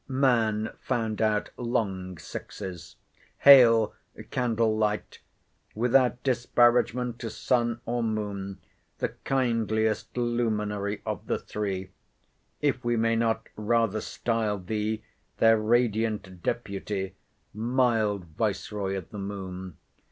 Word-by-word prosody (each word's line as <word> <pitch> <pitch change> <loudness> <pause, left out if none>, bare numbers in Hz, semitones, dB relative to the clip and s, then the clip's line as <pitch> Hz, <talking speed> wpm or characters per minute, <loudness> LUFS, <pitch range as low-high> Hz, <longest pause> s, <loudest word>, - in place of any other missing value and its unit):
Man 115 -5 +2
found 110 -2 -2
out 105 -1 +1
long 95 -7 -2
sixes.—Hail 110 - +3 0.4
candle 115 -3 +1
light! 105 -1 -1 0.6
without 125 +2 +3
disparagement 120 -1 +2
to 115 - -4
sun 120 +1 0
or 120 +1 -1
moon, 100 -3 -3 0.4
the - - -1 0.2
kindliest 115 -4 0
luminary 105 -4 -1
of - - -4
the - - +1
three—if 100 +7 -5
we 120 0 +1
may 115 0 +2
not 115 -1 0
rather 110 -1 +1
style 115 -3 -1
thee 110 +3 -2 0.3
their 115 -1 +5
radiant 110 -4 0
deputy, 100 -3 -3 0.4
mild 110 -4 +1
viceroy 100 +2 -2
of 90 - -7
the 105 - -6
moon! 95 -4 -6
110 Hz, 100 wpm, -27 LUFS, 100-120 Hz, 0.6 s, their